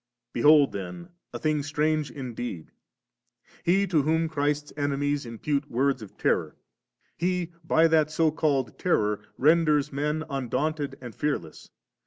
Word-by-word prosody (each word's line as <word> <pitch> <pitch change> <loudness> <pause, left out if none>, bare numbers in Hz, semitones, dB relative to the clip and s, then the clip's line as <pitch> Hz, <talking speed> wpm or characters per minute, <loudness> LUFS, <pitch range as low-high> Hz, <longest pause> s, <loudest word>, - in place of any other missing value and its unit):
Be 120 - -2
hold 145 -1 +6
then 95 - -7 0.2
a - - -5
thing 155 -1 0
strange 155 0 0
indeed! 120 - -6 0.9
He 195 +3 +3
to 170 -6 +2
whom 160 +3 +1
Christ's 145 -1 -1
enemies 145 -1 -1
impute 140 +5 -2
words 135 +1 +1
of 105 - -11
terror, - - 0 0.6
He 180 0 -1
by 160 +1 +4
that 155 -2 +3
so 155 0 +2
called 140 -7 0
♦ - - -33
terror 105 - +1 0.2
renders 150 -1 +3
men 150 +3 -1
un 135 -4 -4
daunted 145 +3 -1
and 120 -3 -8
fearless. 105 - -3
145 Hz, 145 wpm, -26 LUFS, 135-155 Hz, 0.9 s, hold